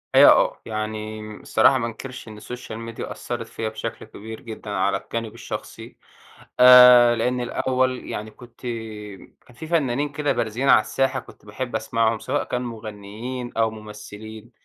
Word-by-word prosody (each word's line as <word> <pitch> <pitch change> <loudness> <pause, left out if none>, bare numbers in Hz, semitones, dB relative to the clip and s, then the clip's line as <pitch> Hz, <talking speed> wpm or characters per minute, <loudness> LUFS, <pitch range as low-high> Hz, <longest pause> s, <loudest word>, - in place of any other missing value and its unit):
أيوه - - +9
آه، - - +2
يعني 110 0 -4 0.2
الصراحة 135 - +4
ما 115 - -1
أنكَرش 125 +1 -8
إن 105 -1 -10
الSocial 115 0 -7
Media - - -6
أثَّرَت - - -5
فيّا 110 - -4
بشكل 110 - -6
كبير 110 +2 -10
جدًا 110 -2 -9
على 95 -1 +1
الجانب 115 -2 -5
الشخصي، - - -8 0.6
آآ 125 -1 +9
لإن 125 +2 0
الأول 130 +1 -1
يعني 105 +1 -5
كنت 120 +2 -16 0.9
كان 125 - -17
في 160 +5 -8
فنانين 145 -4 0
كده 145 0 -1
بارزين 115 +5 -1
على - - +7
الساحة 130 +5 0
كنت - - -16
باحب 130 -3 -5
أسمعهُم، 110 0 0
سواء - - -1
كان 125 0 -3
مغنيين 115 +2 -6
أو 110 -1 +2
ممثّلين، 110 +1 -10
115 Hz, 150 wpm, -23 LUFS, 110-125 Hz, 0.9 s, أيوه